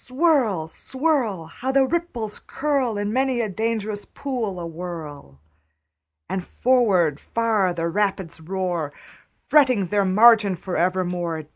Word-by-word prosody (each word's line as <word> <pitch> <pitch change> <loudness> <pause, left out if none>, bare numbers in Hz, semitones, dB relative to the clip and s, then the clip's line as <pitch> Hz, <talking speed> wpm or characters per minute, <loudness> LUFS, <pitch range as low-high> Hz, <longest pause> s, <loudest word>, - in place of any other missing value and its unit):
Swirl, 255 - +1
swirl! 260 - -1
How 250 +11 -4
the 270 0 +4
ripples 260 -9 -3
curl 270 -6 0
In 205 +1 -2
many 260 -1 +1
a 230 - 0
dangerous 215 0 -2
pool 235 -9 -4
awhirl! 165 - -7 0.9
And 190 -1 -3
forward 190 - +2
far 220 -5 0
the 170 -1 -2
rapids 190 -3 -2
roar, 175 -3 -2 0.5
Fretting 255 -9 +4
their 205 +1 +2
margin 210 0 +5
for 180 +1 -6
evermore. 175 -2 -1
205 Hz, 120 wpm, -23 LUFS, 175-250 Hz, 0.9 s, margin